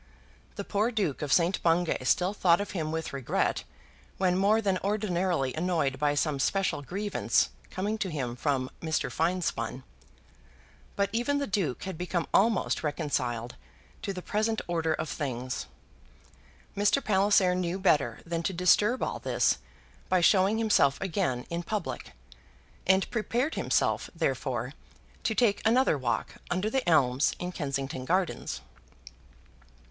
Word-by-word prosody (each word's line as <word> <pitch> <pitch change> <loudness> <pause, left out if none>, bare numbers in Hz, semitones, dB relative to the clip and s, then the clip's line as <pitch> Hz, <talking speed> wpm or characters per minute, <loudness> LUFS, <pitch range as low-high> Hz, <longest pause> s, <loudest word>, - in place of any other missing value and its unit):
The - - -4
poor 210 +3 0
Duke 200 - -1
of 145 -2 -3
St. 175 +4 +3
Bungay 165 -4 +1
still 180 +8 +2
thought 175 -4 +4
of 205 -1 -4
him 160 -5 -2
with 160 -2 -3
regret 135 -3 0 0.5
when 185 -2 +2
more 200 +4 +3
than 195 -4 0
ordinarily 185 - 0
annoyed 155 -6 0
by 145 0 +2
some 145 -1 0
special 175 -1 0
grievance 195 +8 0 0.2
coming 210 +4 -2
to 195 - -1
him 130 -7 -3
from 130 -1 -1
Mr. 160 -1 -1
Finespun; 160 -8 -1 1.1
but 200 0 0
even 245 +5 +1
the 285 - -1
Duke 185 - -1
had 190 -4 -6
become 175 -1 -1
almost 220 0 +3
reconciled 130 -6 -2 0.5
to 205 - -3
the 180 -2 -6
present 220 +1 0
order 165 -2 0
of 160 - -4
things. 130 -4 -4 1.1
Mr. 205 +7 +2
Palliser 195 -2 +4
knew 180 0 -1
better 145 -11 +2
than 170 0 -2
to 190 - -2
disturb 205 +7 +3
all - - -2
this - - +1 0.5
by 185 - +4
showing 190 +4 +4
himself 205 -11 +3
again 170 -10 -1
in 170 0 -1
public; 210 +4 -4 0.7
and 190 +1 +4
prepared 240 +6 0
himself, - - 0
therefore, - - -1 0.5
to 220 - -1
take 210 -4 +2
another 240 -2 +4
walk 130 -4 -2
under 185 +4 -1
the 265 -8 0
elms 135 -4 +3
in 180 0 -4
Kensington 135 -5 -3
Gardens. 185 +3 -1
180 Hz, 140 wpm, -28 LUFS, 150-205 Hz, 1.1 s, thought